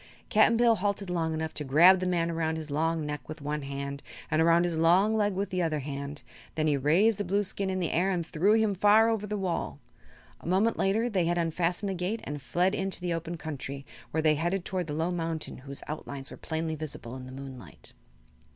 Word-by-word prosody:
Cap'n 220 +1 +5
Bill 235 -1 +4
halted 200 -1 -1
long 165 -2 0
enough 160 0 -3
to 150 - -3
grab 170 +7 +6
the 185 - -1
man 170 -2 +1
around 160 -1 -1
his 155 -2 -6
long 160 +1 0
neck 150 -3 -5
with 155 - -6
one 150 +1 -3
hand 140 0 -5 0.3
and 155 +1 +3
around 170 +1 +5
his 175 -2 -1
long 180 +7 +4
leg 205 -2 +2
with 195 +1 -2
the 185 -1 0
other 160 -3 0
hand. 140 +1 -6 0.3
Then 155 - 0
he 150 -2 +3
raised 180 +11 +3
the - - 0
Blueskin 200 0 -1
in 185 0 -1
the 175 - -1
air 180 +4 +2
and 175 -3 -1
threw 180 +6 +2
him 220 -2 +3
far 210 +4 +5
over 210 -2 -2
the 210 0 -2
wall. 185 -3 -2 0.6
A - - -11
moment 200 +6 +2
later 215 +5 +2
they 190 -7 +1
had 175 +1 +1
unfastened 170 +3 0
the - - -1
gate 185 +5 -2
and 145 0 -5
fled 175 +9 +1
into 195 -2 -1
the 175 -1 -2
open 170 +1 -4
country, 140 -3 -6 0.2
where 160 0 -1
they 155 -1 +5
headed 175 +5 -1
toward 180 -3 -2
the 150 - -4
low 165 +3 0
mountain 165 -4 -3
whose 140 +1 -8
outlines 140 -2 -6
were - - -9
plainly 160 0 -3
visible 145 -6 -7
in 130 -1 -8
the - - -9
moonlight. 130 - -9
165 Hz, 225 wpm, -28 LUFS, 150-190 Hz, 0.6 s, grab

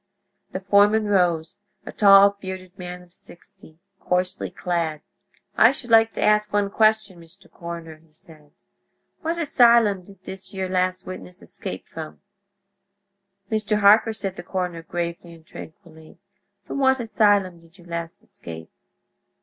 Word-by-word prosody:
The - - -4
foreman 205 +2 +3
rose—a 180 0 -2
tall, 200 -1 +6
bearded 185 -1 -8
man 180 -1 -8
of 175 0 -23
sixty, 175 -3 -17 0.2
coarsely 180 +1 -1
clad. 165 -4 -3 0.5
"I - - +6
should 240 -3 -6
like 225 0 +5
to - - -2
ask 210 0 +2
one 205 -1 0
question, 215 -4 +1
Mr. 170 +4 -16
Coroner," 170 -2 -8
he 160 0 -28
said. 155 -2 -15 0.7
"What 330 +1 -2
asylum 235 - +3
did 195 -1 -18
this 190 +1 -10
yer 190 -1 -2
last 185 0 -1
witness 185 0 -9
escape 190 - -8
from?" 160 -1 -9 1.3
"Mr. 215 -1 0
Harker," 215 +3 +5
said 195 -3 -5
the - - -6
coroner, 180 -2 -4
gravely 170 0 -5
and 160 -1 -20
tranquilly, 160 -1 -13 0.5
"from - - -5
what 265 -1 +3
asylum 205 -6 +1
did 165 +2 -22
you 175 - -18
last 170 -1 -7
escape?" 80 -1 -11
185 Hz, 140 wpm, -23 LUFS, 170-205 Hz, 1.3 s, tall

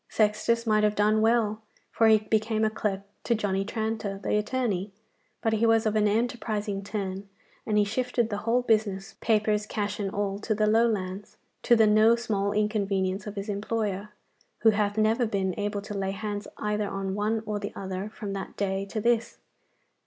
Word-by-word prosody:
Sextus 220 +2 +1
might 215 -1 +3
have 210 0 +2
done 215 +1 +3
well, 220 -1 +2 0.3
for 225 - +3
he 220 0 +7
became 220 +1 +1
clerk 200 -3 -2 0.2
to 235 - +2
Johnny 195 -3 0
Tranter 220 -2 -3
the 200 - -1
attorney; 210 -3 -1 0.5
but 225 - +2
he 225 +1 +2
was 225 0 +4
of 215 0 +1
an 210 -1 +3
enterprising 215 -2 -1
turn, 195 -1 -4 0.4
and 210 -1 +1
he 210 - +5
shifted 240 +2 -1
the 205 - -1
whole 235 +3 +1
business, 215 -3 0
papers, 215 -1 +1
cash, 205 -1 -3
and 200 -2 -1
all 200 0 -2
to 215 +1 -1
the 215 0 +2
Lowlands, 210 -3 0 0.2
to 240 - +5
the 225 -1 +5
no 215 +2 +5
small 205 -4 -1
inconvenience 200 -2 0
of 210 - -6
his 200 +1 -4
employer, 205 -1 -2 0.5
who 220 - +6
hath 205 0 0
never 220 +3 +2
been 195 -3 -1
able 205 0 -2
to 205 - -6
lay 195 -1 -2
hands 205 0 -4
either 210 -1 -1
on 195 -1 -3
one 215 +2 -1
or 210 -1 -2
the 205 0 -5
other 190 +1 -4
from 210 -2 -6
that 195 - -6
day 195 -1 -1
to 215 +3 -3
this. 235 +1 +1
210 Hz, 180 wpm, -27 LUFS, 200-220 Hz, 0.5 s, he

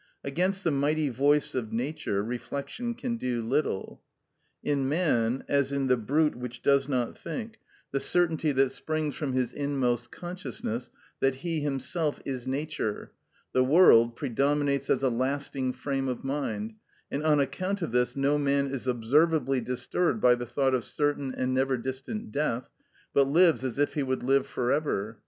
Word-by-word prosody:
Against 185 +7 0
the 165 - +2
mighty 145 +2 +1
voice 145 +4 +2
of 120 -4 -3
Nature 120 -5 -2
reflection 140 - -4
can 240 -1 -3
do 120 - -2
little. 130 -4 -1 0.6
In 140 -2 0
man, 135 -7 +1
as 140 -1 +1
in 140 -1 0
the 130 -1 +4
brute 150 +7 +1
which 125 0 -7
does 140 0 +3
not 125 -3 -1
think, 230 -3 -6 0.3
the 140 - 0
certainty 160 0 +2
that 135 -1 +3
springs 155 0 -2
from 140 -4 -3
his 125 -1 0
inmost 125 -5 -1
consciousness 130 - -5 0.3
that 135 -1 +2
he 165 -2 0
himself 145 +2 -1
is 130 -2 -4
Nature, 135 -5 -3 0.4
the 130 - +4
world, 130 -6 +6
predominates 140 +1 0
as - - +2
a 130 - +4
lasting 130 +1 -1
frame 135 0 -2
of 125 -2 -3
mind; 115 -6 -3 0.4
and 140 - -1
on 150 -2 +4
account 185 +8 -1
of 160 - -3
this 125 +1 +1
no 140 +2 +2
man 140 -1 +1
is 130 -1 -4
observably 135 +3 +2
disturbed 165 - -1
by 125 -10 +6
the 120 0 -3
thought 135 +2 +1
of 125 -3 +1
certain 145 -1 -1
and 130 0 -1
never 130 0 +1
distant 130 - -5
death, 140 -4 -1 0.4
but 140 -1 +4
lives 165 0 +4
as 130 -2 -3
if 145 0 +1
he 150 - -1
would 130 -2 -1
live 135 +1 +2
for 125 0 -1
ever. 115 -8 -1
135 Hz, 165 wpm, -28 LUFS, 125-150 Hz, 0.6 s, world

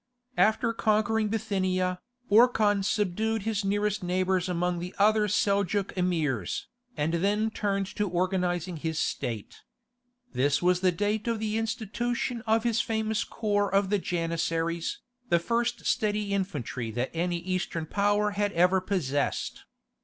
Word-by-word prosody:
After 225 +2 +3
conquering 220 0 +1
Bithynia, 185 -4 -1 0.3
Orkhan 215 -2 +4
subdued 210 +2 0
his 215 -1 -1
nearest 205 +1 0
neighbours 185 0 0
among 180 0 0
the 180 +2 -6
other 210 +1 +4
Seljouk 200 0 +1
Emirs, 155 - -1 0.3
and 150 +3 0
then 205 +5 +1
turned 200 -2 -1
to 210 -2 0
organizing 180 -1 -1
his 160 0 -3
state. 120 -9 -3 0.7
This 140 +3 +2
was 180 0 +3
the 185 0 +3
date 205 +5 -1
of 230 -1 +1
the 215 0 -2
institution 230 +2 -2
of 220 0 +3
his 230 -2 +2
famous 220 -1 -1
corps 205 -3 -1
of 195 0 +2
the 205 - +3
Janissaries, 165 -1 -2 0.3
the 170 - +5
first 235 +6 -1
steady 210 -3 0
infantry 145 - -3
that 120 +4 -2
any 175 +1 0
Eastern 175 -2 -3
power 205 +3 +1
had 205 0 0
ever 180 +2 +4
possessed. 150 -8 -2
195 Hz, 135 wpm, -28 LUFS, 175-215 Hz, 0.7 s, the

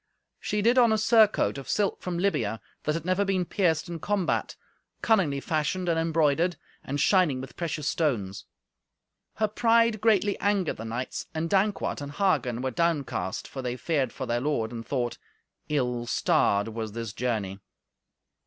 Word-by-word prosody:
She 210 -1 -1
did 240 +3 +5
on 235 -2 +5
a 220 - +3
surcoat 215 - +3
of 135 - -10
silk 205 -2 0
from 180 -1 -3
Libya, 170 - 0 0.3
that 150 - +1
had 165 -1 -4
never 185 +2 +2
been 190 -2 0
pierced 170 -4 +1
in 170 -1 -5
combat, 200 0 -1 0.5
cunningly 180 -11 +2
fashioned 160 +5 -1
and 165 -1 +2
embroidered, 165 +1 +2 0.3
and 145 +2 -3
shining 165 -4 +3
with 130 0 -9
precious 155 -4 -3
stones. 105 - -1 0.9
Her 215 - +1
pride 230 0 +3
greatly 210 -2 +2
angered 200 -4 0
the 115 - -7
knights, 120 +3 -4
and 165 +1 -2
Dankwart 195 -4 +1
and 145 0 -6
Hagen 130 - +1
were 130 - -1
downcast, 130 - -1
for 135 - -6
they 125 -1 -3
feared 135 -2 0
for 130 - -5
their 120 0 -1
lord, 125 -6 -1
and 115 -1 -6
thought, 120 -2 -2 0.5
"Ill 125 -5 -1
starred 100 -3 +2
was 110 -1 -5
this 115 -2 -5
journey." 105 -6 -2
155 Hz, 160 wpm, -27 LUFS, 125-195 Hz, 0.9 s, did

